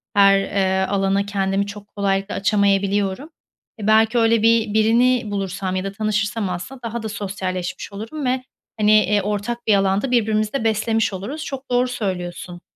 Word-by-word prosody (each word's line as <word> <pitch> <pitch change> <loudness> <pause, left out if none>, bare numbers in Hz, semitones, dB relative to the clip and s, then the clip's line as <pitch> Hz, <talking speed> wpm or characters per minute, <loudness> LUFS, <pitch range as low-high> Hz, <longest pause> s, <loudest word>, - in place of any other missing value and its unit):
Her, 195 -1 +6
eee, 190 -1 0
alana 195 0 +1
kendimi 200 0 -1
çok 205 0 -9
kolaylıkla 195 0 -1
açamayabiliyorum. 200 +3 +1 0.5
Eee, 210 - -4
belki 220 +2 +4
öyle 225 -1 +3
bi 225 -2 +3
birini 230 +1 +3
bulursam 195 -1 -3
ya 185 - -1
da 195 - -4
tanışırsam 215 0 -1
aslında 215 +9 -6
daha 230 0 -4
da 220 - -3
sosyalleşmiş 190 -4 -4
olurum 225 +9 -6
ve, 255 0 0 0.4
hani, 210 0 +4
eee, 210 -1 +4
ortak 210 +4 -3
bir 215 - +5
alanda 195 +6 +1
birbirimizi 215 -2 +1
de 275 - -1
beslemiş 220 0 +1
oluruz. 245 +12 -5
Çok 270 0 -7
doğru 245 +1 +3
söylüyorsun. 180 -6 -5
205 Hz, 160 wpm, -21 LUFS, 195-225 Hz, 0.5 s, Her